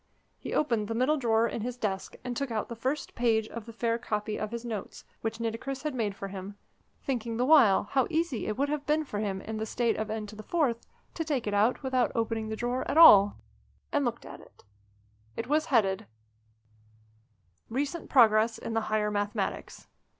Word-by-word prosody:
He - - -7
opened 230 -8 +1
the 225 - -3
middle 260 +6 +2
drawer 230 -3 +2
in 230 - -4
his 245 +2 -4
desk, 195 -5 -3
and 245 -1 -4
took 275 +2 -2
out 220 -2 -3
the 235 - -5
first 270 +5 -3
page 225 -2 +1
of 235 -1 -8
the - - -7
fair 230 0 -1
copy 210 -2 -3
of 215 - -3
his 235 +1 -6
notes, 220 -5 -6 0.2
which 225 0 -3
Nitocris 230 +4 -4
had 300 -2 -2
made 215 -5 -2
for 195 0 -6
him 195 +1 -7 0.5
thinking 235 -4 -2
the 245 - +1
while 260 -10 +6
how 265 -2 +1
easy 320 -7 -1
it 215 - -2
would 280 +2 +1
have 295 0 -3
been 305 +1 +2
for 210 -7 -4
him 195 -2 -2
in 220 +1 -5
the 220 - -2
state 235 0 0
of 215 - -2
N4 220 +6 -1 0.4
to 325 - -2
take 290 -6 -2
it 205 - -2
out 215 +7 +2
without 260 -2 +1
opening 225 -1 -1
the 220 - -3
drawer 245 +3 -2
at - - 0
all 205 -11 +9 0.5
and - - +1
looked - - -3
at - - -10
it. - - -20 0.7
It - - -2
was 310 +3 +1
headed: 210 -6 +1 1.6
"RECENT 285 +7 -3
PROGRESS 225 -3 +5
IN 230 - -5
THE 225 - +1
HIGHER 210 -1 +1
MATHEMATICS." 205 0 -3
230 Hz, 195 wpm, -29 LUFS, 215-260 Hz, 1.6 s, all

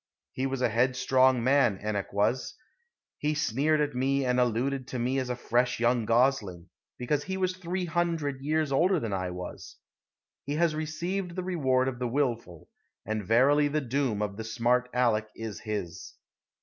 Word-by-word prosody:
He 130 +1 -2
was 135 -1 -3
a - - +3
headstrong 130 +1 +3
man, 130 -7 +3
Enoch 105 -2 -2
was. 105 +6 0 0.6
He 150 +1 0
sneered 150 +2 +1
at 145 -1 -1
me 135 +2 +1
and 125 0 +1
alluded 125 +2 0
to 130 - -5
me 125 +3 0
as 130 -1 -3
a 125 - -1
fresh 125 0 0
young 120 -1 +2
gosling, 115 -8 +1 0.3
because 145 +4 -1
he 190 0 -3
was 185 -1 0
three 180 0 -3
hundred 165 -5 -1
years 155 +1 0
older 175 +6 +3
than 110 -6 -3
I 95 -1 -2
was. 90 0 -8 0.7
He 145 +2 -3
has 165 0 +2
received 170 +4 -3
the 185 - -3
reward 130 -8 +1
of 125 -2 -3
the 125 - -1
willful, 115 - -2 0.4
and 110 0 -2
verily 140 +6 +4
the 150 +1 0
doom 130 -5 -1
of 100 -1 -4
the 110 - -4
smart 120 +3 +1
Aleck 115 -3 +1
is 110 -4 -6
his." 105 -6 -5
130 Hz, 175 wpm, -28 LUFS, 115-145 Hz, 0.7 s, verily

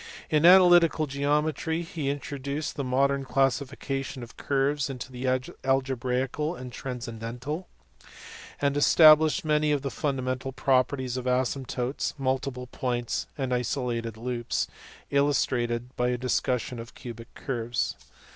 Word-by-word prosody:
In 155 +2 +5
analytical 175 -3 +7
geometry, 150 +4 0
he 160 -4 -3
intro 140 0 -4
duced 140 +2 -3
the 140 - -2
modern 135 +2 +1
classification 135 0 -1
of 115 - -12
curves 140 +1 0
into 130 0 -3
algebraical 135 +3 0
and 125 -4 -8
transcendental; 125 +6 -5 0.9
and 140 0 +1
established 155 +1 +6
many 150 0 +2
of 145 -2 0
the 140 - -2
fundamental 130 -2 -2
properties 130 -1 +1
of 130 - -4
asymptotes, 125 0 -1
multiple 130 -1 -2
points, 120 -1 -2
and 130 -3 -1
isolated 120 -2 -2
loops, 120 0 -2 0.4
illustrated 125 -4 +1
by 125 0 +1
a 125 - 0
discussion 125 0 -1
of 115 +1 -9
cubic 115 -1 -9
curves. 120 -3 -2
135 Hz, 120 wpm, -27 LUFS, 125-145 Hz, 0.9 s, analytical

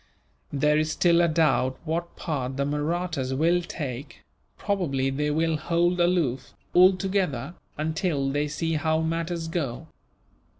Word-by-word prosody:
There 150 +2 +2
is 155 0 0
still 170 -1 +4
a 170 - +4
doubt 135 -5 +2
what 170 +2 -3
part 135 -5 -3
the 140 - +1
Mahrattas 150 -2 -1
will 170 +5 +3
take 145 -6 -6 0.3
probably 140 -10 0
they 150 +2 -1
will 160 +1 +1
hold 175 +3 +1
aloof, 170 -8 +1 0.2
altogether, 185 -6 +3 0.2
until 155 -2 -1
they 145 +1 0
see 165 +2 -2
how 160 0 +1
matters 165 +1 -2
go. 155 -8 -3
160 Hz, 130 wpm, -26 LUFS, 140-175 Hz, 0.3 s, still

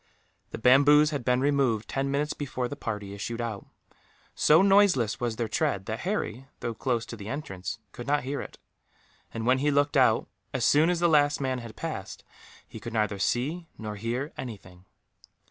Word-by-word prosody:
The - - -6
bamboos 145 +5 +6
had 145 -4 -3
been 125 +1 +2
removed, 135 -6 +1
ten 135 0 -2
minutes 145 +2 0
before 130 -3 -3
the 145 - -6
party 105 -7 -5
issued 115 +4 -5
out. 115 -4 -4 0.7
So 160 +5 +5
noiseless 195 - +4
was 120 -2 -1
their 115 0 -2
tread 100 -2 -1
that 110 0 -4
Harry, 135 - -3
though 120 - -3
close 120 0 -1
to 115 - -8
the 105 -2 -9
entrance, 100 - -5
could 120 - -9
not 145 -1 +1
hear 140 +2 -3
it; - - -10 0.7
and 115 0 -4
when 130 +2 +3
he 145 +2 +2
looked 145 +1 +2
out, 125 -5 +4 0.3
as 125 -3 +1
soon 155 +3 +5
as 175 -1 +1
the 170 - +5
last 145 -2 +3
man 130 -2 -1
had 115 -2 -9
passed, - - -6 0.4
he - - -10
could 115 +1 -7
neither 105 -3 0
see 150 - -1
nor 105 -1 -5
hear 120 +7 -3
anything. 95 -7 -9
125 Hz, 185 wpm, -27 LUFS, 110-145 Hz, 0.7 s, bamboos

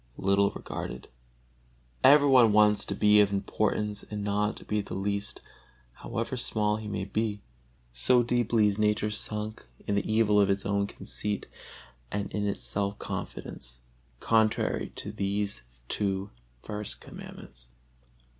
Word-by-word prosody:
little 100 +1 +3
regarded. - - -6 1.0
Every 145 +1 +7
one 125 -5 +6
wants 105 -1 +4
to - - -2
be 105 0 +5
of 100 -1 +3
importance 105 +1 -1
and 105 -1 -4
not 105 +1 0
to - - -12
be 105 0 0
the 100 - -7
least, 100 +1 -2 0.5
however 115 - -4
small 105 -4 0
he 110 -1 -7
may 105 0 -3
be; 105 -2 -2 0.5
so 120 - +4
deeply 120 -2 +2
is 105 0 +1
nature 105 0 +2
sunk 105 - -3 0.2
in 105 - -1
the 100 +1 0
evil 105 -2 +4
of 100 - +3
its 100 0 0
own 100 0 +1
conceit 105 0 -5 0.7
and 100 -1 -3
in 105 0 0
its 100 - -3
self 100 0 0
confidence - - -6 0.4
contrary 110 -1 +1
to - - -5
these 100 -6 -1 0.3
two 95 - -1 0.3
first 105 -1 -3
Commandments. - - -11
105 Hz, 140 wpm, -28 LUFS, 100-110 Hz, 1.0 s, Every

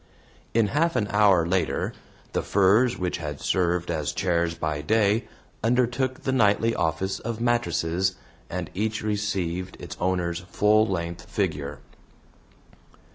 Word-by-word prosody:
In 115 -3 +3
half 165 +6 +1
an 105 - +1
hour 100 -5 +4
later, 90 +2 0 0.4
the - - +1
furs 105 +6 +3
which 90 -1 -2
had 75 -3 -5
served 90 -2 0
as 75 -3 -2
chairs 85 -3 0
by 75 -3 -2
day 110 +5 +2 0.4
undertook 125 +2 +1
the 130 - 0
nightly 115 -2 +3
office 95 +3 -1
of 115 0 -4
mattresses, 95 -6 +1 0.3
and - - -4
each 110 +2 -2
received 95 -4 -2
its - - -7
owner's 90 -1 0
full 105 +4 +3
length 85 -3 -3
figure. 70 -1 -2
95 Hz, 130 wpm, -25 LUFS, 85-110 Hz, 0.4 s, hour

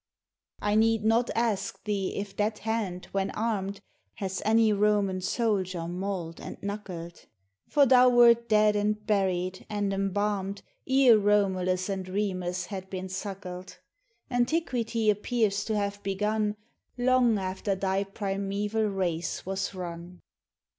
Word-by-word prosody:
1 210 +1 +3
need 225 -1 +2
not 230 +2 +3
ask 215 -4 -1
thee 200 -3 -2
if 200 -1 -5
that 210 +1 0
hand, 210 -5 -3
when 195 0 0
armed, 205 -3 -2 0.3
Has 190 -1 -4
any 220 0 +4
Roman 205 -2 +2
soldier 185 -5 -1
mauled 180 -2 -4
and - - -7
knuckled; 185 -5 -6 0.4
For 290 -1 +5
thou 255 -1 +6
wert 235 -1 +5
dead 210 -1 +4
and 210 0 0
buried 185 -3 0
and 205 -2 -1
embalmed 195 0 -1 0.3
Ere 260 -4 +6
Romulus 190 -3 +1
and 190 -2 -4
Remus 185 -2 -2
had 190 -1 -7
been 185 -1 -5
suckled: 185 -1 -6 0.5
Antiquity 240 -4 +1
appears 210 -1 0
to 220 - -1
have 205 0 -2
begun 210 +2 -1 0.4
Long 245 -2 +3
after 190 +1 -2
thy 190 +1 0
primeval 200 +2 -2
race 175 -5 -2
was 195 +1 -3
run. 175 0 -7
200 Hz, 125 wpm, -28 LUFS, 190-215 Hz, 0.5 s, thou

